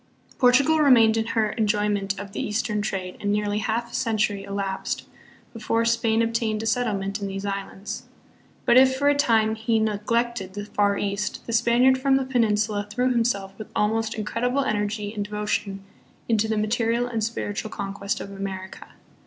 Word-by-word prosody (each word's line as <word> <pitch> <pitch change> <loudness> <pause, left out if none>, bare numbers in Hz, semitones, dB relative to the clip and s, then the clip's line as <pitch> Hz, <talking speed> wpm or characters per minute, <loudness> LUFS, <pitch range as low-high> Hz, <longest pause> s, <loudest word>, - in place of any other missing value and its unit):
Portugal 275 +5 +5
remained 235 -7 +6
in 225 0 0
her 215 -1 +2
enjoyment 205 -2 0
of 200 -1 -7
the - - -4
Eastern 210 0 -1
trade 190 -3 -4
and 205 - -1
nearly 210 0 0
half 230 +2 -2
a - - -16
century 210 -3 0
elapsed 200 -1 -3 0.5
before 230 0 0
Spain 230 -1 +2
obtained 225 -1 -1
a - - -4
settlement 205 -4 -1
in 200 - -2
these 195 +1 -5
islands. 195 0 -5 0.6
But 240 - +5
if 260 0 +6
for 285 +1 +3
a - - +5
time 225 -6 +3
he 225 +1 0
neg 215 -1 -1
lected 230 -5 0
the 205 0 -5
Far 205 -1 +1
East, 200 +1 -3
the 230 - -4
Spaniard 240 +3 +4
from 270 0 +3
the 270 -1 +1
Peninsula 215 -4 +1
threw 250 +4 +1
himself 225 -5 0
with 215 - -8
almost 220 +2 0
incredible 245 +5 -1
energy 210 -2 -2
and 205 -1 -4
devo 210 0 -4
tion 195 -2 -2 0.4
into 220 -1 +2
the 220 0 -1
material 230 +2 +1
and 230 -3 -2
spiritual 215 -1 -3
conquest 200 0 -4
of 200 - -7
America. 195 -1 -6
215 Hz, 175 wpm, -24 LUFS, 205-230 Hz, 0.6 s, remained